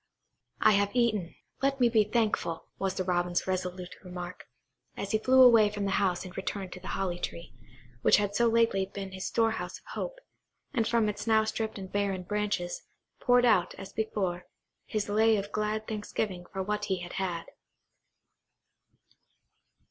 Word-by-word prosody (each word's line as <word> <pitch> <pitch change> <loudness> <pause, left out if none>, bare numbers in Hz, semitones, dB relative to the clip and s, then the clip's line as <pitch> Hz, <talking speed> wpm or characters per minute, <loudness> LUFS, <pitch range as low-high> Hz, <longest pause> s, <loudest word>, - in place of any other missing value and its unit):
"I - - +7
have 200 +2 +2
eaten; 215 -8 +1 0.3
let 275 0 +1
me 245 - +5
be 225 -2 +4
thankful," 210 -6 0
was 195 -1 -1
the 185 - -1
Robin's 175 -1 0
resolute 180 -1 -3
remark, 180 -1 -7 0.5
as 200 - -4
he 215 - +2
flew 260 +3 +6
away 230 -4 +7
from 205 -1 -3
the 195 - 0
house 185 -2 0
and 185 - -10
returned 190 -1 -4
to - - -9
the 185 - -10
holly 180 -2 -2
tree, 170 -1 -6 0.5
which - - +6
had 205 -1 0
so 235 +3 +3
lately 225 -4 +3
been 195 0 -7
his 190 0 -4
storehouse 225 -1 0
of - - -23
hope, - - -4 0.6
and 230 -4 +1
from 230 -2 +2
its 210 +2 -4
now 220 -1 +5
stripped 220 0 -3
and 190 -1 -8
barren 200 -2 -1
branches, 200 -2 -2 0.4
poured 245 0 +4
out, 200 -7 +3
as 195 - -9
before, 190 -5 -2 0.4
his 215 -1 -2
lay 220 +1 +4
of 200 0 -4
glad 215 +1 -1
thanksgiving 205 -4 -3
for 190 - -2
what 210 +1 -2
he 190 -3 -1
had 175 - -7
had. 175 -3 -2
205 Hz, 170 wpm, -29 LUFS, 185-220 Hz, 0.6 s, I